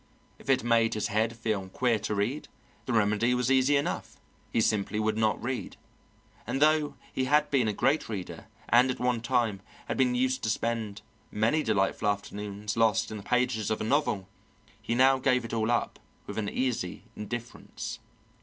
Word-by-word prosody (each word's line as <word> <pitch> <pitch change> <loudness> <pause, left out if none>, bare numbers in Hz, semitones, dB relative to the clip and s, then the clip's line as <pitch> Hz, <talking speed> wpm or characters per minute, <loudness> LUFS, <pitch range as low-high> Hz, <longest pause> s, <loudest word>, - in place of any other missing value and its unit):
If - - -12
it 135 - +3
made 115 -1 +3
his 105 - -1
head 110 +2 0
feel 110 -4 -2
queer 120 +2 +1
to 105 +1 -2
read, 115 +9 -1 0.4
the 125 - -1
remedy 110 +3 +2
was 125 +1 +1
easy 135 +2 +4
enough 140 - -3 0.3
he - - +1
simply 105 -1 +1
would 110 0 +1
not 110 -1 +1
read; 125 +2 -4 0.7
and 135 - -1
though 150 -1 +3 0.2
he 130 - 0
had 150 +3 +3
been 130 -5 +3
a - - +2
great 135 +8 +1
reader, 100 -5 -6 0.2
and 125 +2 +5
at 130 - -2
one 125 -2 0
time 115 -5 0 0.3
had - - -2
been 125 -2 +3
used 130 +1 +1
to 110 - -1
spend 110 -2 -2 0.3
many 115 +9 +1
delightful 105 -3 0
afternoons 105 0 -3
lost 115 -3 +2
in 110 - -4
the - - -7
pages 125 -1 0
of 110 - 0
a - - -2
novel, 110 -6 0 0.5
he 115 - -2
now 130 +1 +5
gave 125 -2 +2
it 115 - -7
all 110 0 0
up 120 - 0 0.3
with - - -5
an 105 -2 -2
easy 120 -9 -2
indifference. 120 +3 -6
115 Hz, 180 wpm, -28 LUFS, 105-130 Hz, 0.7 s, and